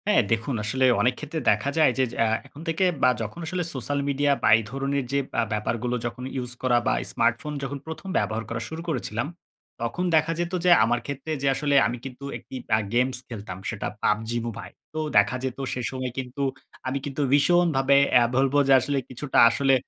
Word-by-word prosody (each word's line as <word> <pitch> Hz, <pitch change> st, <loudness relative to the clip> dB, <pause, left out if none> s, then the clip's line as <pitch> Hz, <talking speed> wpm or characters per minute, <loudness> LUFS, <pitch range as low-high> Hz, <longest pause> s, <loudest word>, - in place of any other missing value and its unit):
হ্যাঁ, 210 Hz, -8 st, +5 dB
দেখুন 115 Hz, +3 st, 0 dB
আসলে 130 Hz, +5 st, +1 dB, 0.2 s
অনেক 125 Hz, +3 st, +3 dB
ক্ষেত্রে 150 Hz, +2 st, -4 dB
দেখা 105 Hz, +7 st, 0 dB
যায় 155 Hz, -4 st, +5 dB
যে 130 Hz, -, +3 dB
যে -, -, -9 dB
আ -, -, +2 dB, 0.2 s
এখন 145 Hz, +2 st, -13 dB
থেকে 165 Hz, +3 st, +1 dB, 0.2 s
বা 125 Hz, -, +7 dB
যখন 110 Hz, +8 st, -5 dB
আসলে 180 Hz, +1 st, -2 dB
সোশ্যাল 140 Hz, +2 st, -2 dB
মিডিয়া 145 Hz, +1 st, +2 dB
বা -, -, +4 dB
এই 115 Hz, -, -3 dB
ধরনের 135 Hz, +1 st, -1 dB
যে 140 Hz, -, +2 dB, 0.2 s
আ -, -, +3 dB
ব্যাপারগুলো 115 Hz, +3 st, -1 dB
যখন 120 Hz, +1 st, -5 dB
ইউস 125 Hz, -2 st, -3 dB
করা 125 Hz, -2 st, +3 dB
বা -, -, +3 dB, 0.2 s
স্মার্টফোন 120 Hz, +6 st, 0 dB
যখন 140 Hz, +1 st, -3 dB
১ম 160 Hz, +4 st, -7 dB
ব্যবহার 110 Hz, +2 st, -1 dB
করা 115 Hz, 0 st, -3 dB
শুরু 160 Hz, +1 st, -6 dB
করেছিলাম, 120 Hz, -3 st, -2 dB, 0.5 s
তখন 120 Hz, +10 st, -2 dB
দেখা 160 Hz, +1 st, +3 dB
যেত 175 Hz, +1 st, -2 dB
যে 180 Hz, -, +6 dB
আমার 120 Hz, +1 st, +2 dB
ক্ষেত্রে 140 Hz, +3 st, -5 dB
যে 140 Hz, -, 0 dB
আসলে 145 Hz, +1 st, 0 dB
আমি 120 Hz, -, -4 dB
কিন্তু 135 Hz, +1 st, -8 dB
একটি -, -, -12 dB, 0.2 s
আ -, -, +1 dB
গেমস 125 Hz, +1 st, +2 dB
খেলতাম। 100 Hz, -5 st, -7 dB
সেটা 110 Hz, -4 st, -3 dB, 0.2 s
PUBG 110 Hz, +2 st, +1 dB, 0.2 s
Mobile 115 Hz, -, -7 dB, 0.2 s
তো 155 Hz, -, -3 dB, 0.2 s
দেখা 105 Hz, +5 st, +4 dB
যেত 130 Hz, -1 st, -3 dB, 0.2 s
সে 125 Hz, -, -3 dB
সময় 130 Hz, -1 st, -4 dB
কিন্তু 130 Hz, +2 st, -4 dB, 0.4 s
আমি 130 Hz, +1 st, -1 dB
কিন্তু 140 Hz, 0 st, -3 dB
ভীষণভাবে 145 Hz, -3 st, +4 dB, 0.2 s
আ -, -, +5 dB
বলব 135 Hz, +1 st, +2 dB
যে 135 Hz, -, +6 dB
আসলে 140 Hz, +3 st, -1 dB
কিছুটা 130 Hz, +2 st, 0 dB
আসলে 135 Hz, +3 st, +2 dB
130 Hz, 200 wpm, -25 LUFS, 120-145 Hz, 0.5 s, বা